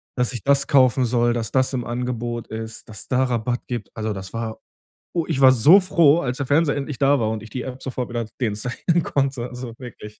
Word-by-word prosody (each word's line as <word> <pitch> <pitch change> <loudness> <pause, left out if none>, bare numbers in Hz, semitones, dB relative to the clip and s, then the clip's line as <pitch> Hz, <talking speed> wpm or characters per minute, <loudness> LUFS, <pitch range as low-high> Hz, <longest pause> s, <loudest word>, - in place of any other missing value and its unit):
dass 125 0 0
ich 120 - -6
das 140 0 +2
kaufen 130 -2 +4
soll, 120 0 +2
dass 115 -3 -3
das 130 0 +1
im 125 - -1
Angebot 120 -1 -4
ist, 110 0 -7
dass 105 -2 -9
es - - -13
da 130 0 +2
Rabatt 120 -1 -1
gibt. 120 -5 -5
Also, 110 -1 -2
das 95 -1 -8
war 115 -1 -4 0.5
oh, 170 -2 0
ich 145 -5 -1
war 130 -1 +8
so 145 - +7
froh, 170 -4 +4
als 125 -1 -3
der 140 - -3
Fernseher 145 +2 +2
endlich 140 -1 -4
da 140 0 +3
war 110 -2 0
und 110 -1 -4
ich 110 - -11
die 125 - -4
App 130 0 -7
sofort 125 -2 -4
wieder 120 -1 -3
deinstallieren 125 - -1
konnte, 135 -3 -1
also 125 -1 -8
wirklich. 110 -4 -11
125 Hz, 230 wpm, -22 LUFS, 115-135 Hz, 0.5 s, war